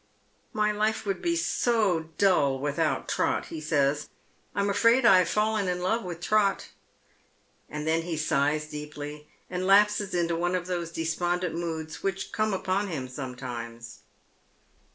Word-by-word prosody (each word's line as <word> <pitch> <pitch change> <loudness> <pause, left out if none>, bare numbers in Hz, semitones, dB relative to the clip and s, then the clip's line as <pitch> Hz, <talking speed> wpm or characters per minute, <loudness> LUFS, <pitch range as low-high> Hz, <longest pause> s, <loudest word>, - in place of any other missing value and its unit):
"My 210 0 +1
life 215 +1 0
would 195 -1 -2
be 340 -1 +1
so 215 - +1
dull 145 -9 +3
without 145 +1 -1
Trot," - - 0
he 160 - -5
eays. 150 -1 +1 0.5
"I'm 200 0 +1
afraid 230 +5 +4
I 190 -5 +8
have 180 - +1
fallen 215 -1 +1
in 180 0 -1
love 220 +6 0
with 175 -2 -6
Trot." 205 0 +1 1.0
And 150 0 -5
then 160 +1 +2
he 170 0 -4
eighs 150 -1 +1
deeply, 150 0 -7 0.2
and 185 0 -3
lapses 205 0 +4
into 170 -1 +1
one 175 +2 0
of 180 -1 -2
those 175 -2 -3
despondent 175 +2 -1
moods 160 -2 -4
which 195 -1 -3
come 215 0 0
upon 190 +1 0
him 145 -8 -4
sometimes. 125 -3 -7
175 Hz, 150 wpm, -27 LUFS, 150-200 Hz, 1.0 s, I